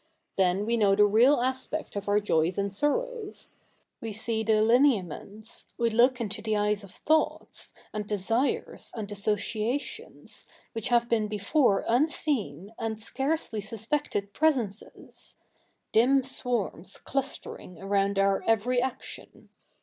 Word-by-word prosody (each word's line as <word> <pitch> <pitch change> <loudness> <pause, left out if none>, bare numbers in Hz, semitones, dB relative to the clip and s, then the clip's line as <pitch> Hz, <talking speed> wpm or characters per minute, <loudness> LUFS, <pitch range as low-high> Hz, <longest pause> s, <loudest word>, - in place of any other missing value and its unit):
Then 190 +1 +2
we 235 +1 +1
know 200 -3 +4
the 210 +1 +6
real 240 +6 +5
aspect 260 +4 -2
of 205 0 -3
our 205 +1 +4
joys 175 -4 +1
and 200 -1 -1
sorrows. 435 - -2 0.4
We 225 - -5
see 220 +1 -1
the 220 -1 +3
lineaments, 220 - +1
we 235 -1 +1
look 245 +3 +4
into 215 -2 -2
the 215 -1 0
eyes 210 0 +1
of 200 - -11
thoughts, 310 +10 -1 0.2
and 210 -1 -4
desires, 225 +6 0
and 210 -3 -5
associations, 215 +5 -3 0.2
which 225 -2 -4
have 235 -1 +3
been 225 -3 +1
before 210 +2 +2
unseen 235 - 0
and 220 -1 -3
scarcely 265 -1 -1
suspected 220 -1 -2
presences 250 -10 -2 0.3
— - - -45
dim 260 +4 +4
sw^arms 240 -9 -3
clustering 265 - -4
around 195 +1 0
our 195 0 +3
every 235 +3 +2
action. 260 0 -6
220 Hz, 130 wpm, -28 LUFS, 205-255 Hz, 0.4 s, the